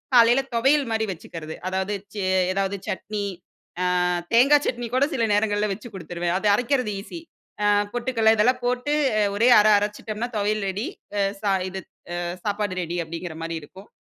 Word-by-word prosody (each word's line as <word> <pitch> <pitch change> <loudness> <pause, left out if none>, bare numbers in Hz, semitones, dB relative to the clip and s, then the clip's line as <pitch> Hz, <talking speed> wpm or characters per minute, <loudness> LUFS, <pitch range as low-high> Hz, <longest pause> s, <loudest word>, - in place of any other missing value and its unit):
காலையில 240 +2 +6
துவையல் 270 +3 +3
மாரி 220 0 +1
வச்சுக்குறது. 160 -2 -8
அதாவது 190 +2 -2 0.2
சே 200 -2 -2 0.3
ஏதாவது 195 +1 -1
சட்னி 205 +2 -3 0.8
ஆ - - +2 0.3
தேங்கா 280 +5 +7
சட்னி 240 -1 -2
கூட 265 +2 +4
சில 235 -4 +1
நேரங்கள்ல 210 0 +1
வச்சுக் 215 +2 -9
குடுத்துருவேன். 175 -1 -3
அத 210 - -3
அரைக்கிறது 250 -1 0
ஈசி. 335 - -8 0.4
ஆ - - +4 0.3
பொட்டுக்கல்ல 235 -2 +2
இதெல்லாம் 250 +4 +2
போட்டு 250 +4 0 0.4
ஒரே 230 +4 +3
அரை 215 0 +5
அரைச்சுட்டோம்னா 210 +3 -3
தொவையல் 210 0 0
ரெடி. 195 +4 -3 0.3
ஆ - - +2 0.2
சா 200 -2 +2 0.2
இது 190 0 -6 0.4
அ 175 - -2 0.2
சாப்பாடு 205 -2 -1
ரெடி 170 +1 -4
அப்டிங்கிற 165 0 -6
மாரி 165 0 -3
இருக்கும். 190 +7 -14
210 Hz, 160 wpm, -24 LUFS, 190-240 Hz, 0.8 s, தேங்கா